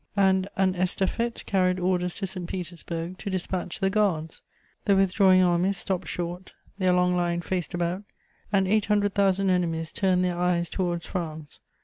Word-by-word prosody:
And 190 Hz, -1 st, +3 dB
an 190 Hz, -1 st, +2 dB
estafette 190 Hz, +6 st, -1 dB
carried 185 Hz, -2 st, +1 dB
orders 180 Hz, -1 st, 0 dB
to 200 Hz, -, -3 dB
St. 180 Hz, -2 st, -5 dB
Petersburg 175 Hz, 0 st, -5 dB
to 205 Hz, -, -4 dB
dispatch 185 Hz, -1 st, -3 dB
the 195 Hz, 0 st, +1 dB
Guards. 185 Hz, -7 st, 0 dB, 0.4 s
The 200 Hz, -, +4 dB
withdrawing 190 Hz, -1 st, +5 dB
armies 180 Hz, +2 st, +2 dB
stopped 180 Hz, -1 st, -2 dB
short; 175 Hz, +2 st, -5 dB, 0.3 s
their 185 Hz, -1 st, +3 dB
long 180 Hz, 0 st, +3 dB
line 175 Hz, -1 st, 0 dB
faced 180 Hz, 0 st, -3 dB
about, 175 Hz, +2 st, -1 dB, 0.5 s
and 195 Hz, -2 st, +2 dB
eight 215 Hz, +1 st, +2 dB
hundred 205 Hz, -1 st, +1 dB
thousand 195 Hz, -1 st, +2 dB
enemies 165 Hz, -3 st, 0 dB
turned 185 Hz, -2 st, +2 dB
their 175 Hz, -1 st, -1 dB
eyes 175 Hz, -1 st, +1 dB
towards 175 Hz, -3 st, -2 dB
France. 160 Hz, -5 st, -6 dB
185 Hz, 160 wpm, -26 LUFS, 175-195 Hz, 0.5 s, withdrawing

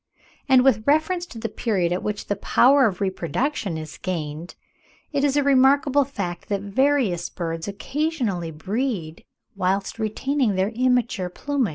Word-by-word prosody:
And, 260 Hz, -1 st, +6 dB
with 255 Hz, -5 st, +4 dB
reference 320 Hz, +4 st, +2 dB
to 240 Hz, -, -11 dB
the 225 Hz, -, -3 dB
period 185 Hz, -7 st, 0 dB
at 180 Hz, -, -2 dB
which 210 Hz, 0 st, -3 dB
the 205 Hz, -, -1 dB
power 260 Hz, +6 st, +4 dB
of 190 Hz, -2 st, -4 dB
reproduction 190 Hz, -, -2 dB
is 155 Hz, 0 st, -8 dB
gained, 165 Hz, -2 st, -4 dB, 0.6 s
it 285 Hz, -2 st, 0 dB
is 290 Hz, 0 st, +2 dB
a 290 Hz, -, +3 dB
remarkable 275 Hz, +1 st, +4 dB
fact 190 Hz, -10 st, -5 dB
that 200 Hz, -2 st, -1 dB
various 205 Hz, -4 st, +1 dB
birds 165 Hz, 0 st, -4 dB
occasionally 235 Hz, -, -2 dB
breed 185 Hz, -, -3 dB, 0.3 s
whilst 195 Hz, +3 st, -1 dB
retaining 225 Hz, +1 st, 0 dB
their 190 Hz, +2 st, +1 dB
immature 240 Hz, -5 st, 0 dB
plumage. 275 Hz, +3 st, -1 dB
215 Hz, 150 wpm, -23 LUFS, 180-275 Hz, 0.6 s, And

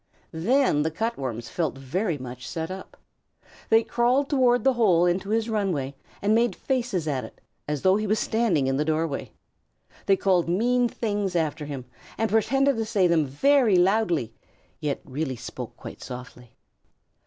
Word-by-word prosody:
Then 185 Hz, -, +2 dB
the 160 Hz, -, +1 dB
Cut 225 Hz, +9 st, -2 dB
Worms 120 Hz, -4 st, -5 dB
felt 160 Hz, -6 st, -2 dB
very 165 Hz, +6 st, -2 dB
much 125 Hz, 0 st, -8 dB
set 160 Hz, +1 st, -4 dB
up. 190 Hz, 0 st, -9 dB, 0.7 s
They 225 Hz, +1 st, +5 dB
crawled 250 Hz, +5 st, +1 dB
toward 245 Hz, -4 st, +3 dB
the 265 Hz, -, +4 dB
hole 190 Hz, -8 st, +4 dB
into 180 Hz, +3 st, 0 dB
his 225 Hz, +1 st, +1 dB
run 210 Hz, -4 st, 0 dB
way 140 Hz, -3 st, -3 dB, 0.3 s
and 205 Hz, +1 st, +3 dB
made 235 Hz, +1 st, +2 dB
faces 240 Hz, -, -1 dB
at 135 Hz, -4 st, -1 dB
it, -, -, -11 dB, 0.3 s
as 150 Hz, -2 st, -3 dB
though 190 Hz, +1 st, +5 dB
he 215 Hz, 0 st, -2 dB
were 210 Hz, -, +2 dB
standing 220 Hz, -, +1 dB
in 135 Hz, 0 st, 0 dB
the 150 Hz, -, +1 dB
doorway. 155 Hz, -1 st, -2 dB, 0.8 s
They 195 Hz, -, +4 dB
called 180 Hz, -4 st, +2 dB
mean 240 Hz, +6 st, +2 dB
things 205 Hz, -5 st, -2 dB
after 155 Hz, -2 st, -1 dB
him 140 Hz, -4 st, -6 dB, 0.3 s
and 225 Hz, -1 st, 0 dB
pretended 270 Hz, +5 st, +2 dB
to 225 Hz, -, -1 dB
say 210 Hz, -4 st, +2 dB
them 165 Hz, -4 st, +3 dB
very 245 Hz, -, +3 dB
loudly, 180 Hz, -, +2 dB, 0.5 s
yet 145 Hz, -2 st, -2 dB
really 135 Hz, 0 st, -3 dB
spoke -, -, -8 dB
quite -, -, -10 dB
softly. 125 Hz, -1 st, -10 dB
185 Hz, 170 wpm, -25 LUFS, 150-225 Hz, 0.8 s, They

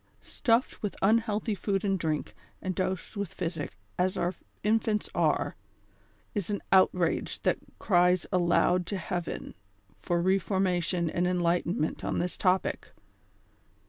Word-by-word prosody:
Stuffed 235 Hz, -1 st, +1 dB
with 205 Hz, -, -3 dB
unhealthy 220 Hz, +1 st, +2 dB
food 195 Hz, +1 st, -1 dB
and 195 Hz, -1 st, +1 dB
drink, 155 Hz, -2 st, -2 dB, 0.3 s
and 185 Hz, -, -2 dB
dosed 185 Hz, +2 st, -2 dB
with 200 Hz, -4 st, -3 dB
physic, 165 Hz, -, -4 dB, 0.2 s
as 185 Hz, +1 st, +1 dB
our 175 Hz, +2 st, 0 dB, 0.3 s
infants 215 Hz, 0 st, +1 dB
are, -, -, +1 dB, 0.8 s
is 205 Hz, -3 st, -2 dB
an 205 Hz, -1 st, -1 dB
outrage 185 Hz, -2 st, +3 dB
that -, -, +2 dB, 0.2 s
criesialoud'to 180 Hz, 0 st, +2 dB
heaven 175 Hz, -1 st, -4 dB, 0.5 s
for 175 Hz, -1 st, 0 dB
reformation 180 Hz, -1 st, +1 dB
and 175 Hz, +2 st, 0 dB
enlightenment 175 Hz, -2 st, 0 dB
on -, -, -1 dB
this 175 Hz, +1 st, -1 dB
topic. 185 Hz, 0 st, 0 dB
185 Hz, 115 wpm, -29 LUFS, 175-200 Hz, 0.8 s, outrage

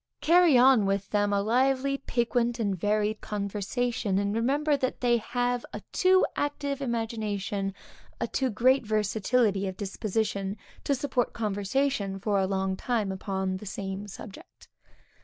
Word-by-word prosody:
Carry 340 Hz, -4 st, +5 dB
on 245 Hz, -5 st, +6 dB
with 195 Hz, 0 st, -1 dB
them 205 Hz, -1 st, +2 dB
a 200 Hz, 0 st, +1 dB
lively, 265 Hz, +4 st, +1 dB
piquant 240 Hz, -1 st, 0 dB
and 200 Hz, -4 st, 0 dB
varied 210 Hz, +3 st, 0 dB
conversation; 210 Hz, +1 st, -2 dB
and 200 Hz, +1 st, 0 dB
remember 285 Hz, +7 st, +1 dB
that 260 Hz, -2 st, -2 dB
they 240 Hz, -1 st, +3 dB
have 245 Hz, +2 st, -1 dB
a -, -, -6 dB
too 375 Hz, 0 st, +4 dB
active 285 Hz, -1 st, -2 dB
imagination, 215 Hz, -5 st, -2 dB, 0.5 s
a -, -, -1 dB
too 265 Hz, -1 st, 0 dB
great 255 Hz, +4 st, +3 dB
versatility 215 Hz, -1 st, +1 dB
of 190 Hz, -1 st, -5 dB
disposition, 200 Hz, 0 st, -2 dB, 0.3 s
to 280 Hz, -, +2 dB
support 255 Hz, -2 st, -1 dB
conversation 205 Hz, 0 st, -1 dB
for 200 Hz, 0 st, 0 dB
a 190 Hz, -, +1 dB
long 190 Hz, 0 st, -1 dB
time 215 Hz, -2 st, -1 dB
upon 190 Hz, -1 st, -2 dB
the 210 Hz, -, -10 dB
same 195 Hz, +1 st, -5 dB
subject. 200 Hz, 0 st, -12 dB
220 Hz, 140 wpm, -28 LUFS, 200-250 Hz, 0.5 s, on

